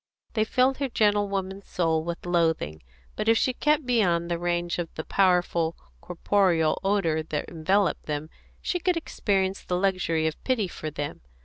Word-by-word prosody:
They 215 Hz, -2 st, +2 dB
filled 255 Hz, +3 st, +2 dB
her 275 Hz, -2 st, -1 dB
gentlewoman's 200 Hz, -3 st, 0 dB
soul 160 Hz, -3 st, 0 dB
with 170 Hz, +1 st, -5 dB
loathing; 160 Hz, -, 0 dB, 0.3 s
but 220 Hz, -, 0 dB
if 225 Hz, -, +5 dB
she 255 Hz, -, +1 dB
kept 300 Hz, +2 st, +1 dB
beyond 175 Hz, -9 st, +2 dB
the 170 Hz, -, 0 dB
range 175 Hz, 0 st, -1 dB
of 170 Hz, -2 st, -3 dB
the 155 Hz, -, -4 dB
powerful 175 Hz, -3 st, +2 dB, 0.3 s
corporeal 175 Hz, -3 st, +1 dB
odour 190 Hz, -6 st, +1 dB
that 155 Hz, -1 st, -4 dB
enveloped 190 Hz, +4 st, 0 dB
them, 150 Hz, +1 st, -3 dB, 0.3 s
she 355 Hz, -, -1 dB
could 360 Hz, 0 st, +1 dB
experience 195 Hz, -10 st, -1 dB
the 180 Hz, -, -1 dB
luxury 180 Hz, -4 st, +1 dB
of 160 Hz, -1 st, -3 dB
pity 240 Hz, -7 st, +1 dB
for 155 Hz, -3 st, -6 dB
them. 145 Hz, -1 st, -5 dB
180 Hz, 165 wpm, -26 LUFS, 165-205 Hz, 0.3 s, if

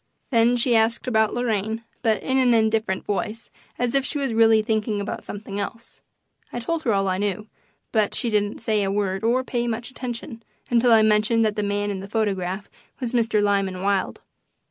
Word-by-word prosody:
Then 235 Hz, 0 st, +4 dB
she 240 Hz, 0 st, +2 dB
asked 225 Hz, +1 st, +2 dB
about 220 Hz, -3 st, +2 dB
Lorraine, 225 Hz, -2 st, -1 dB, 0.2 s
but 220 Hz, -3 st, +1 dB
in 265 Hz, 0 st, +1 dB
an 245 Hz, -2 st, +4 dB
indifferent 220 Hz, -3 st, +1 dB
voice, 210 Hz, +2 st, -3 dB, 0.3 s
as 245 Hz, -1 st, -1 dB
if 275 Hz, -1 st, +2 dB
she 290 Hz, -, -3 dB
was 270 Hz, -4 st, -1 dB
really 225 Hz, -1 st, +5 dB
thinking 215 Hz, -1 st, -1 dB
about 200 Hz, -, -5 dB
something 205 Hz, -1 st, -6 dB
else. 230 Hz, +3 st, -7 dB, 0.5 s
I 240 Hz, -, -4 dB
told 325 Hz, +7 st, -2 dB
her 235 Hz, -, +3 dB
all 195 Hz, 0 st, +1 dB
I 185 Hz, 0 st, 0 dB
knew, 205 Hz, 0 st, -2 dB, 0.5 s
but 215 Hz, -2 st, +1 dB
she 235 Hz, -, -1 dB
didn't 205 Hz, 0 st, 0 dB
say 220 Hz, -2 st, +1 dB
a 195 Hz, -, 0 dB
word 195 Hz, -1 st, -1 dB
or 245 Hz, +3 st, +2 dB
pay 240 Hz, -2 st, -2 dB
much 235 Hz, +2 st, -3 dB
attention 240 Hz, -1 st, -6 dB, 0.3 s
until 240 Hz, 0 st, +4 dB
I 220 Hz, -1 st, +7 dB
mentioned 215 Hz, +1 st, +3 dB
that 210 Hz, -1 st, 0 dB
the 210 Hz, -, -1 dB
man 205 Hz, 0 st, -1 dB
in 195 Hz, -, -4 dB
the 195 Hz, -, -7 dB
photograph 195 Hz, -3 st, -2 dB, 0.3 s
was 245 Hz, -3 st, -3 dB
Mr. 225 Hz, -4 st, +2 dB
Lyman 195 Hz, -2 st, 0 dB
Wilde. 200 Hz, -1 st, 0 dB
220 Hz, 195 wpm, -23 LUFS, 205-235 Hz, 0.5 s, I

